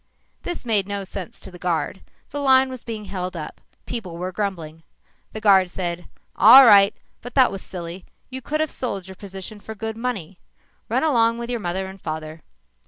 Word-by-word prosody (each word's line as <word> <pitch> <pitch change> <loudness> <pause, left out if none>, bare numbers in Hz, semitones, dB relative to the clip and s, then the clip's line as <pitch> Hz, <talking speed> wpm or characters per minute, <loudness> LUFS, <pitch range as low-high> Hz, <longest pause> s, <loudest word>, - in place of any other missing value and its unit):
This 350 -6 -5
made 210 -5 +1
no 200 -1 -3
sense 190 -1 -7
to 190 - -12
the 180 - -12
guard. 180 +1 -2 0.3
The 290 - -4
line 265 -1 +5
was 255 -2 -7
being 220 -3 -6
held 185 -2 -5
up. 155 - -8 0.2
People 190 -8 -5
were 180 +2 -4
grumbling. 170 -5 -4 0.5
The 220 - -6
guard 190 -3 +5
said, 175 -1 -4 0.3
"All 255 +6 +10
right, 200 -3 +7 0.3
but 245 - -9
that 260 -2 +5
was 195 -1 -6
silly. 175 0 -7 0.3
You 260 0 -5
could 305 +5 -2
have 310 - -1
sold 200 -7 -4
your 190 - -9
position 195 +2 -8
for 220 +2 -9
good 220 +1 -4
money. 220 -7 -4 0.5
Run - - +1
along 230 -6 +3
with 235 +1 -5
your 240 - -1
mother 190 0 -2
and 190 0 -10
father." 155 0 -6
200 Hz, 190 wpm, -22 LUFS, 180-235 Hz, 0.5 s, All